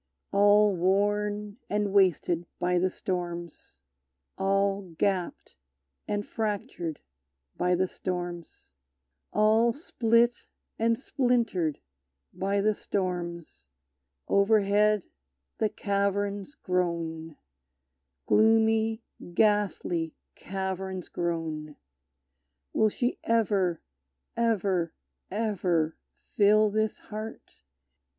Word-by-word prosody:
All 205 0 +5
worn 205 +3 0
and 205 -1 0
wasted 175 -3 +2
by 180 0 +1
the 185 +1 +2
storms, 175 - -5 0.5
All 195 -1 0
gapped 185 - -1 0.5
and 205 0 -1
fractured 200 -7 -3 0.5
by 180 0 +2
the 185 +1 +1
storms, 175 - -6 0.6
All 220 +3 +4
split 235 -4 +1 0.3
and 230 0 +2
splintered 235 - 0 0.5
by 200 +1 0
the 215 +1 +3
storms, 175 - -4 0.6
Overhead 205 0 +3 0.6
the 215 - +2
caverns 200 +3 -1
groan, 165 - -2 0.9
Gloomy, 220 +1 +3 0.3
ghastly 200 -6 +1 0.2
caverns 190 -1 -4
groan! 160 -3 -3 1.0
Will 215 - +4
she 245 +4 -2
ever, 200 -7 +1 0.5
ever, 195 -7 +1 0.3
ever 180 -7 0 0.4
fill 210 +1 +5
this 215 +1 0
heart? 215 +1 -9
200 Hz, 80 wpm, -28 LUFS, 175-215 Hz, 1.0 s, All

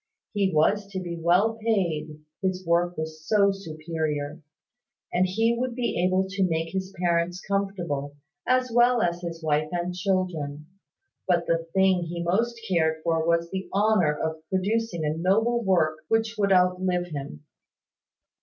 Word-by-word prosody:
He 200 -2 +1
was 195 +6 +2
to 190 - -2
be 175 -2 -5
well 180 +7 +2
paid, 160 -8 -1 0.2
his 185 -1 -2
work 175 +1 +1
was 155 0 -5
so 200 +2 +3
superior; 155 -4 -4 0.7
and 180 +1 +3
he 225 +5 +1
would 245 0 -2
be 240 -8 -1
able 185 +1 +2
to 195 0 -1
make 165 -1 -1
his 190 0 -3
parents 175 0 0
comfortable, 175 -8 -2 0.3
as 255 -1 +2
well 240 0 +4
as 175 0 -1
his 165 -2 -6
wife 155 0 +1
and 175 0 -2
children. 180 -6 -2 0.6
But 175 -2 +2
the 165 0 0
thing 190 -2 +3
he 170 +1 -4
most 230 +7 0
cared 160 -3 +1
for 165 -1 +1
was 170 0 +1
the 190 0 -4
honour 195 -7 +2
of 160 0 -3
producing 190 -2 -1
a 150 +1 0
noble 220 +8 +2
work 160 -5 +2
which 225 +2 +1
would 200 -2 +1
outlive 180 -1 +2
him. 140 - -7
180 Hz, 155 wpm, -26 LUFS, 160-195 Hz, 0.7 s, well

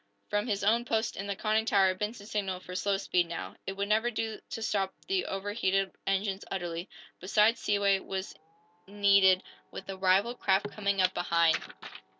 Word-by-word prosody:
From 205 +3 0
his 205 -3 -1
own 225 +4 +3
post 225 -2 -1
in 195 - -5
the 200 - -2
conning 215 +2 +1
tower 195 -4 +4
Benson 210 +2 -5
signaled 195 -4 -3
for 180 - -9
slow 195 +2 0
speed, 180 -3 +1
now. 170 - -6
It 195 - -2
would 200 +1 -3
never 220 +3 +2
do 220 -1 -3
to 225 - -5
stop 195 -3 -1
the 380 0 0
overheated 195 -1 -1 0.2
engines 195 0 0
utterly. 175 -1 -4 0.3
Besides, 210 +5 +3
seaway 200 -1 +2
was 190 0 -5 0.5
needed, 200 -2 +4 0.3
with 190 - -8
the 195 0 -6
rival 195 +5 +3
craft 205 -3 +1
coming 200 -2 0
up 185 0 +2
behind. 170 -2 +2
200 Hz, 170 wpm, -30 LUFS, 190-210 Hz, 0.5 s, tower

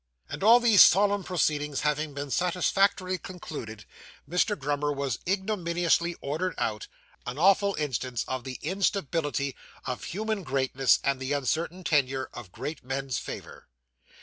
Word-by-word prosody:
And - - -6
all 230 +3 +8
these 230 -5 +6
solemn 205 +1 +6
proceedings 150 -5 0
having 150 0 -1
been 140 -1 -5
satisfactorily 185 +2 +1
concluded, 115 - -8 0.4
Mr. 180 +6 +1
Grummer 145 0 -1
was 140 -3 -2
ignominiously 175 -3 0
ordered 160 +6 -2
out 105 -2 -2 0.4
an 125 +2 -4
awful 195 +4 +4
instance 130 -4 -2
of 130 -1 -3
the 130 -1 -6
instability 160 -6 -1 0.3
of 125 -1 -4
human 215 +2 -2
greatness, 135 -3 +2
and 140 -1 +1
the 135 +2 -2
uncertain 160 +6 -1
tenure 135 -5 +1
of 115 -7 -9
great 150 - -6
men's 135 -3 -3
favour. - - -9
150 Hz, 135 wpm, -27 LUFS, 135-185 Hz, 0.4 s, all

